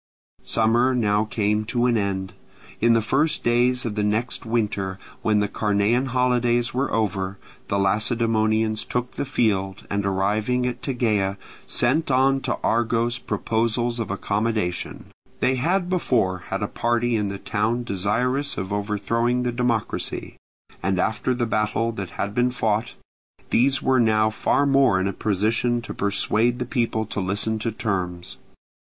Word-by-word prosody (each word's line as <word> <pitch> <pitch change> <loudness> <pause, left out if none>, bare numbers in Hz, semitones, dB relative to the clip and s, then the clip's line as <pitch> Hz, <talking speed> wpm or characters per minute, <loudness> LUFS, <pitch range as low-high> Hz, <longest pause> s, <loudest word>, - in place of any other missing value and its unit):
Summer 120 +3 +2
now 105 -2 +2
came 105 0 0
to 120 +2 0
an 120 -1 +3
end. 95 -3 -2 0.5
In 115 +1 +4
the 115 -1 +2
first 145 +8 +1
days 125 +1 +2
of 115 - -2
the 105 - -1
next 110 +3 -1
winter, 105 -4 -1 0.2
when 105 -1 +2
the 105 - +1
Carnean 105 +5 +1
holidays 120 -1 +1
were 130 +2 -1
over, 100 -3 -1 0.3
the 100 - 0
Lacedaemonians 110 +1 +1
took 125 +1 -3
the - - -4
field, 100 -8 0
and 100 0 0
arriving 105 +6 0
at 125 0 -3
Tegea 105 -7 0 0.3
sent 140 +7 +1
on 135 +1 +3
to - - -2
Argos 120 +1 +1
proposals 115 +2 -1
of 115 - -3
accommodation. 100 -1 -2 0.3
They 130 - +2
had 175 +7 +1
before 120 - +1
had - - -2
a - - 0
party 120 0 0
in 105 -2 0
the 100 0 -4
town 110 +4 -1
desirous 120 +8 -1
of 95 +1 -3
overthrowing 110 +4 0
the 125 - 0
democracy; 120 -2 -2 0.5
and 95 +1 0
after 110 +6 0
the 120 -1 0
battle 110 +1 0
that 100 -5 -5
had 100 +1 -2
been 125 +2 +2
fought, 110 -2 -1 0.6
these 135 +2 +3
were 130 -1 +3
now 110 -2 +3
far 140 +5 +1
more 135 -8 +4
in 95 - 0
a 100 - -2
position 110 +5 0
to - - -6
persuade 105 +4 +1
the 125 - -3
people 115 -3 -1
to 105 - -4
listen 100 +3 0
to 115 +1 -2
terms. 90 -5 -3
110 Hz, 155 wpm, -23 LUFS, 105-125 Hz, 0.6 s, In